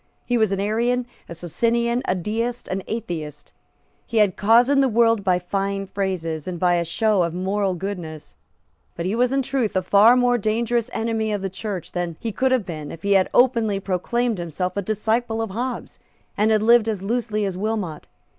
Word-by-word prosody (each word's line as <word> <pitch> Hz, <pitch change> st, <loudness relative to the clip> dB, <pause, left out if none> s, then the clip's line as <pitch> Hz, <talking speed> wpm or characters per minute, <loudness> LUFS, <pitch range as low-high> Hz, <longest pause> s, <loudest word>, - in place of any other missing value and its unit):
He 245 Hz, -, 0 dB
was 220 Hz, -4 st, +2 dB
an 195 Hz, -, -1 dB
Arian, 235 Hz, +5 st, 0 dB, 0.2 s
a 170 Hz, -, -7 dB
Socinian, 235 Hz, +8 st, 0 dB
a 185 Hz, -, +1 dB
Deist, 230 Hz, +6 st, -3 dB
an 190 Hz, +1 st, -2 dB
Atheist. 155 Hz, -9 st, -5 dB, 0.6 s
He 230 Hz, -, -3 dB
had 210 Hz, -3 st, +4 dB
cozened 240 Hz, +6 st, +4 dB
the 270 Hz, -, +3 dB
world 230 Hz, -2 st, +3 dB
by 185 Hz, -2 st, +3 dB
fine 195 Hz, +2 st, -2 dB
phrases, 185 Hz, -5 st, -3 dB
and 180 Hz, -2 st, -4 dB
by 180 Hz, 0 st, +3 dB
a 170 Hz, -1 st, +1 dB
show 210 Hz, +4 st, +1 dB
of 170 Hz, -1 st, -1 dB
moral 190 Hz, +1 st, -1 dB
goodness: 175 Hz, -4 st, -6 dB, 0.6 s
but 170 Hz, -, -4 dB
he 190 Hz, -, -1 dB
was 245 Hz, +1 st, +2 dB
in 270 Hz, 0 st, +1 dB
truth 250 Hz, -6 st, -1 dB
a 185 Hz, -, +1 dB
far 210 Hz, +6 st, +6 dB
more 245 Hz, -1 st, +3 dB
dangerous 230 Hz, +2 st, 0 dB
enemy 225 Hz, -1 st, -1 dB
of 205 Hz, -2 st, -2 dB
the 195 Hz, -, -3 dB
Church 190 Hz, -2 st, -5 dB
than 175 Hz, -2 st, -3 dB
he 230 Hz, -, -3 dB
could 260 Hz, +5 st, 0 dB
have 255 Hz, -6 st, +2 dB
been 155 Hz, -4 st, -6 dB
if 165 Hz, -, -10 dB
he 200 Hz, -, 0 dB
had 190 Hz, -2 st, +4 dB
openly 230 Hz, -5 st, +3 dB
proclaimed 205 Hz, +4 st, -1 dB
himself 175 Hz, +2 st, -3 dB
a 200 Hz, -, 0 dB
disciple 220 Hz, +3 st, -1 dB
of 225 Hz, -3 st, -2 dB
Hobbes, 245 Hz, +4 st, -5 dB, 0.4 s
and 215 Hz, +1 st, +2 dB
had 215 Hz, -1 st, +3 dB
lived 230 Hz, 0 st, +5 dB
as 205 Hz, -4 st, -3 dB
loosely 215 Hz, -1 st, -1 dB
as 190 Hz, -2 st, -3 dB
Wilmot. 195 Hz, -5 st, -3 dB
210 Hz, 195 wpm, -22 LUFS, 185-235 Hz, 0.6 s, far